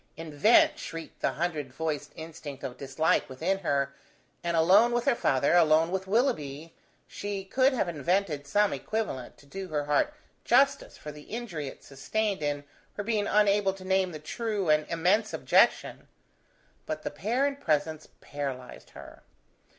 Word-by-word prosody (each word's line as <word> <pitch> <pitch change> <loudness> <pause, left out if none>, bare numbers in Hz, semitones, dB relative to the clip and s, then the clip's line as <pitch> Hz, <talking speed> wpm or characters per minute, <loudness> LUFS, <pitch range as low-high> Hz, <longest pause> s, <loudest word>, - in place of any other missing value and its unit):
Invent! 165 +7 +3
shrieked 165 -1 -8
the - - +1
hundred 155 -5 -3
voiced 155 +1 -3
instinct 155 -4 -9
of 125 - -5
dislike 140 +4 0
within 165 +9 -1
her, 140 -6 0 0.5
and 170 -1 0
alone 200 +9 +5
with 240 0 0
her 275 - +4
father, 140 - +1
alone 165 -1 +4
with 190 0 -2
Willoughby, 165 - -1 0.3
she 200 -1 -5
could 260 +7 +3
have 235 - 0
invented 165 -1 -1
some 205 +7 +2
equivalent, 215 - -4
to - - -19
do 190 +6 -7
her 150 -3 -2
heart 150 - +2 0.3
justice 275 +3 +2
for 150 - -8
the 150 0 -13
injury 200 - -5
it - - -10
sustained 195 +9 -2
in 145 -1 -2 0.3
her 205 - -3
being 210 -1 0
unable 205 -2 +3
to 190 -1 -12
name 190 -1 +1
the 155 - -6
true 205 +4 -3
and 150 0 +2
immense 185 +6 +1
objection: - - +2 0.8
but - - -4
the - - -3
pair 245 +6 0
in 285 -1 -1
presence 155 - -1
paralyzed 135 -3 -6
her. - - -12
170 Hz, 160 wpm, -28 LUFS, 150-205 Hz, 0.8 s, alone